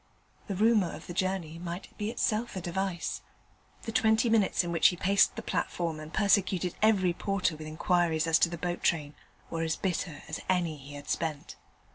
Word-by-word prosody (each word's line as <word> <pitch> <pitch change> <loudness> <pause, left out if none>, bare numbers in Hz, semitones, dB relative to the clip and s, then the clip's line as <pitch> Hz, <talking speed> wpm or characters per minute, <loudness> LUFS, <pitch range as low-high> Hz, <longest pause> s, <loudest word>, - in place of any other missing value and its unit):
The 200 - -3
rumour 210 -2 +3
of - - -11
the 175 - -7
journey 180 -3 -2
might 175 +1 -7
be 210 +1 -3
itself 225 0 -1
a 185 - -3
device. 180 0 -2 0.6
The 225 - -4
twenty 225 -1 +3
minutes 210 -4 +3
in 175 - -3
which 165 -2 +5
he 180 - +1
paced 195 +3 +3
the - - -6
platform 165 -3 -2
and 155 0 -9
persecuted 190 -3 +2
every 195 -5 +4
porter 195 -2 -1
with 155 0 -8
inquiries 160 0 +1
as 165 0 +4
to 170 - +4
the 170 - -5
boat 175 +1 -3
train 150 -3 0 0.4
were 165 - -2
as 160 -1 0
bitter 175 -5 -3
as 155 - -4
any 175 -4 +1
he 140 +1 -11
had 145 0 -10
spent. 155 -3 -3
175 Hz, 190 wpm, -29 LUFS, 165-195 Hz, 0.6 s, which